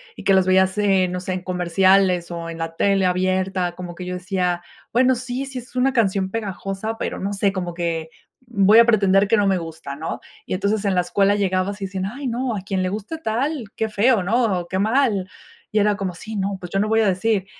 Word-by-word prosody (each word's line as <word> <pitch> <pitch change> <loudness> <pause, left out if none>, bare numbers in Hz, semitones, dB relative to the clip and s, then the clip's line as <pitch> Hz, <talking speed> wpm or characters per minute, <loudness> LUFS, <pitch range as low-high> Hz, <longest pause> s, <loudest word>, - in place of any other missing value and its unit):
y - - -10
que 195 - +4
las 190 -1 +4
veías 190 +1 +3
en 195 -3 +2
no 180 - -3
sé, 185 +1 -4
en 185 0 -4
comerciales, 185 0 +2
o 170 -1 -5
en 165 - -7
la 165 0 -4
tele 195 -1 +2
abierta, 185 0 0
como 175 -1 -7
que 180 - -7
yo 180 - -4
decía: 180 -1 -1 0.3
"Bueno, 255 +1 +4
sí, 250 +2 -4
sí 270 -1 -8
es 245 +1 -14
una 255 +2 +2
canción 195 -4 +1
pegajosa, 205 0 -4
pero - - -4
no 200 +1 -2
sé, 200 0 +1
como 180 -3 -4
que 165 -2 -3 0.4
voy 210 -1 +5
a 235 - +8
pretender 195 -3 +4
que 225 - +3
no 205 -2 +2
me 190 -1 +2
gusta", 160 -4 -7
¿no?, 160 +2 -4 0.3
y - - -4
entonces, 200 +2 0
en 195 -2 +1
la 180 - +4
escuela 195 +3 +2
llegabas 195 0 -1
y - - -1
decían: 190 0 -4
"Ay 255 +7 -5
no, 245 0 -2
a 200 - -4
quien 190 -1 -2
le 185 - 0
guste 210 - -5
tal, 270 0 -2
qué 220 - -1
feo, 215 +1 +3
¿no?, 210 -1 +1
o 175 - -11
qué 190 - -1
mal". 215 -3 +1 0.4
Y 215 - +3
era 210 0 +2
como: 190 -2 -3
"Sí, 215 +3 -7
¿no?, 195 +1 -1
pues, 180 -1 -8
yo 195 - 0
no 210 - +1
voy 220 +1 +3
a 215 - +3
decir", 195 +1 +1
195 Hz, 240 wpm, -22 LUFS, 185-220 Hz, 0.4 s, a